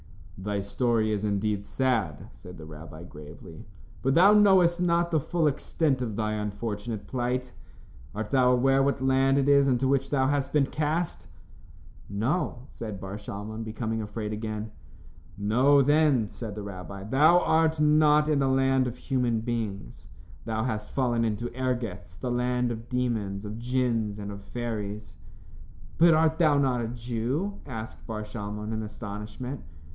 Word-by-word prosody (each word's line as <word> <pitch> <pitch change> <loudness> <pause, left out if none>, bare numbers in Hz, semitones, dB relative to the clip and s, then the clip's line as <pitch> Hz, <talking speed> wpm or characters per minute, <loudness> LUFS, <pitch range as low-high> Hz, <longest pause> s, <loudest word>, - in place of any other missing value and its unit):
"Thy 100 +1 -3
story 110 +2 0
is 105 -1 -1
indeed 100 0 -1
sad," 115 - -1
said 90 0 -12
the 80 - -10
rabbi, 80 +1 -10
gravely, 80 +2 -12 0.3
"but 135 +1 +1
thou 190 +5 +7
knowest 190 -4 +5
not 170 -1 +2
the 160 - +3
full 165 +3 -1
extent 145 -1 0
of 115 -4 -3
thy 110 0 -1
unfortunate 105 +1 -4
plight. 125 0 -2 0.6
Art 105 0 -4
thou 125 -2 +4
aware 135 +2 +3
what 140 0 +1
land 135 +1 +3
it 140 0 +2
is 140 -1 +5
into 130 0 +2
which 135 0 +1
thou 135 -2 +2
hast 140 0 0
been 145 -2 +3
cast?" 155 +4 -2 0.8
"No," 120 - -1
said 110 -4 -7
Bar 95 +2 -6
Shalmon, 105 +2 -6
becoming 110 0 -3
afraid 105 0 -4
again. 110 0 -4 0.7
"Know 125 +8 +4
then," 145 -5 +3
said 110 -1 -7
the 105 - -5
rabbi, 95 0 -8
"thou 150 - +5
art 160 -1 +2
not 150 0 +4
in 150 -2 +2
a 135 -1 +2
land 135 -1 +3
of 125 0 -5
human 125 -4 0
beings. 110 - -4 0.4
Thou 110 -1 -1
hast 110 -4 -3
fallen 120 -3 0
into 115 +2 -2
Ergetz, 120 -9 -3
the 125 - -3
land 125 0 0
of 115 0 -7
demons, 110 -6 -2
of 105 +2 -6
djinns, 120 -4 0
and 100 -1 -6
of 100 0 -8
fairies." 105 -3 -5 0.8
"But 165 -1 +7
art 160 +1 +2
thou 155 -4 +4
not 130 -3 +2
a 115 - -2
Jew?" 125 - -3
asked 110 -4 -7
Bar 110 -1 -4
Shalmon, 105 0 -5
in 110 - -2
astonishment. 105 +4 -6
120 Hz, 160 wpm, -27 LUFS, 105-135 Hz, 0.8 s, thou